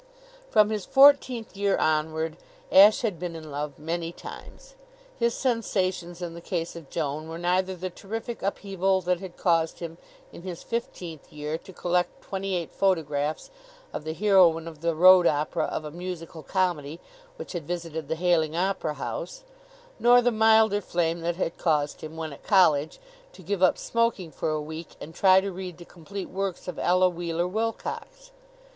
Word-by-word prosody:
From 210 0 +4
his 210 -3 -2
fourteenth 265 -5 +4
year 200 0 +1
onward 155 +1 0 0.4
Ashe 205 +5 +7
had 205 -8 -1
been 175 -1 -4
in 155 -2 -9
love 145 0 -4
many 165 +2 -3
times. - - -11 0.5
His 235 0 +1
sensations 185 -8 -1
in 170 -1 -5
the 170 - -9
case 170 -1 -3
of 165 -5 -10
Joan 155 -1 -3
were 165 - -6
neither 185 +2 0
the 185 +1 -5
terrific 225 +5 -6
upheaval 195 -1 0
that 180 0 0
had 185 -2 -9
caused 165 -2 +1
him, 170 0 -7 0.3
in - - -10
his 180 -2 -7
fifteenth 175 -9 -5
year, 150 +1 -4
to 190 - -13
collect 180 0 -1
twenty 195 -1 -3
eight 170 -2 -3
photographs 155 - 0 0.4
of - - -5
the 160 +1 -4
heroine 180 -5 +4
of 160 -2 -10
the 170 -1 0
road 180 +1 +7
company 150 0 0
of 155 - -4
a 150 - -6
musical 170 -1 -7
comedy 165 -3 -1 0.4
which - - -8
had 170 -6 -5
visited 165 -3 -4
the 160 - -1
Hayling 165 -2 +1
Opera 175 -4 -1
House, - - -5 0.6
nor 245 +1 +6
the 245 0 +2
milder 220 -2 +4
flame 170 -2 -1
that 170 +1 -1
had 170 -2 -3
caused 150 -4 0
him, 155 +1 -8
when 160 -2 -4
at - - -13
college, 160 -7 +3 0.4
to - - -14
give 200 -2 -2
up 185 - +4
smoking 230 -7 -1
for - - -3
a 155 0 0
week 155 +2 -8
and 160 - -9
try 190 +1 +6
to 195 +1 -3
read 180 -2 -7
the 175 - -12
complete 185 +4 -8
works 190 -1 -3
of 180 - -5
Ella 185 +1 +4
Wheeler 175 -1 -2
Wilcox. 230 - -4
175 Hz, 175 wpm, -26 LUFS, 160-195 Hz, 0.6 s, Ashe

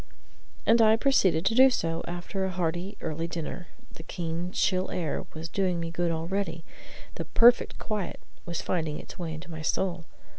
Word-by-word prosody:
And 230 +1 +5
I 220 0 +7
proceeded 195 - +3
to 225 - +3
do 260 +3 +8
so 165 -9 -1
after 175 +3 -4
a 190 - 0
hearty 175 +2 -2
early 165 +1 -3
dinner: 170 +1 -5 0.2
the - - -11
keen, 170 +1 -4
chill 185 -1 +1
air 165 -4 -2
was 160 +1 -5
doing 180 0 0
me 165 0 -3
good 175 0 0
already: 165 0 -2 0.5
the - - -3
"perfect 240 +1 +5
quiet" 210 -4 -3 0.2
was 170 -2 -4
finding 160 -4 -1
its - - -11
way 170 -2 -3
into 170 +2 -9
my 160 -1 -6
soul. 170 +1 -1
175 Hz, 175 wpm, -28 LUFS, 165-195 Hz, 0.5 s, do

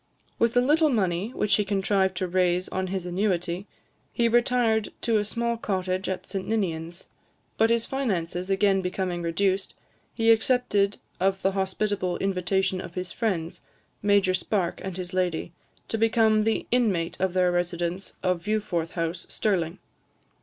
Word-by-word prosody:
With 230 +1 +2
a - - +6
little 305 +4 +4
money, 195 -4 0
which 205 -1 +1
he 210 - +2
contrived 195 -1 +1
to 185 -1 -1
raise 180 0 +1
on 190 0 -2
his 185 -1 -3
annuity, 180 0 -1 0.4
he 235 - +2
retired 235 -2 +2
to 225 -2 +2
a - - 0
small 235 +2 -1
cottage 185 -3 -2
at 190 - -3
St 195 -2 -4
Ninians; 170 -5 -2 0.5
but 225 +1 +3
his 230 0 +2
finances 185 -9 -2
again 195 0 +3
becoming 180 -1 -2
reduced, 190 +3 0 0.4
he 225 -1 +4
accepted 220 -3 +2 0.2
of 195 +1 +1
the 195 - +3
hospitable 190 -1 -1
invitation 190 0 0
of 170 - -9
his 180 0 -4
friends, 185 -8 -2 0.4
Major 200 -2 +3
Spark 185 -1 -1
and 190 -2 -5
his 180 0 -6
lady, 175 -2 -1 0.3
to 225 - -2
become 220 -1 +3
the 225 - 0
inmate 185 -9 +1
of 190 -2 +1
their 180 -1 +3
residence 175 +1 -2
of 180 -2 +1
Viewforth 205 -6 -1
House, 165 +1 -3
Stirling. 180 -4 0
190 Hz, 155 wpm, -26 LUFS, 180-215 Hz, 0.5 s, a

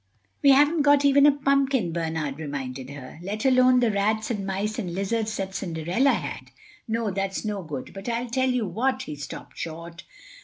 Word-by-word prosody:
"We 280 - +5
haven't 295 +4 +5
got 285 0 +4
even 280 +1 +6
a - - +7
pumpkin," 275 - +1
Bernard 160 -4 -3
reminded 135 -3 -5
her, 140 +1 -10
"let 210 +7 -4
alone 255 -1 +5
the 235 -2 +3
rats 215 +3 0
and 200 -4 -3
mice 205 +4 -2
and 175 -6 -4
lizards 215 +2 -1
that 190 -1 -4
Cinderella 180 - +1
had. - - -5 0.4
No, 225 -2 -1
that's 195 +2 -3
no 205 -2 -2
good. 150 -6 -7
But 195 +4 -6
I'll 235 +1 -2
tell 260 +1 +1
you 250 -3 0
what." 255 +8 -1
He 150 - -6
stopped 145 - -9
short. 170 +2 -7
210 Hz, 185 wpm, -25 LUFS, 170-255 Hz, 0.4 s, a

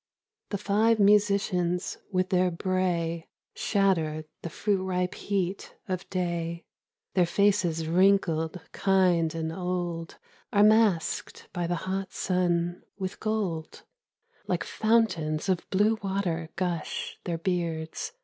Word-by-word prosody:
The 200 - -1
five 210 +3 +3
musicians 200 -4 +2
with 185 -1 +1
their 185 -1 +3
bray 170 -2 -1 0.2
Shatter 165 -7 +1 0.2
the 170 - -5
fruit 195 +3 0
ripe 180 -1 -1
heat 195 -1 -3
of 185 -2 -4
day; 170 -2 -2 0.5
Their 180 -2 +3
faces 175 -4 +2
wrinkled 175 -2 +2
kind 180 -4 +2
and 160 0 -2
old 175 -2 -3 0.3
Are 205 0 +5
masked 210 -6 +2
by 175 -1 -1
the 175 - 0
hot 190 0 -3
sun 175 -1 0 0.2
with 190 -1 -4
gold; 200 -8 -2 0.6
Like - - 0
fountains 195 -9 +1
of 185 -3 0
blue 210 +3 +2
water, 190 -5 -2
gush 175 -3 -3
Their 170 -2 -1
beards. 170 - -2
180 Hz, 115 wpm, -28 LUFS, 170-195 Hz, 0.6 s, Are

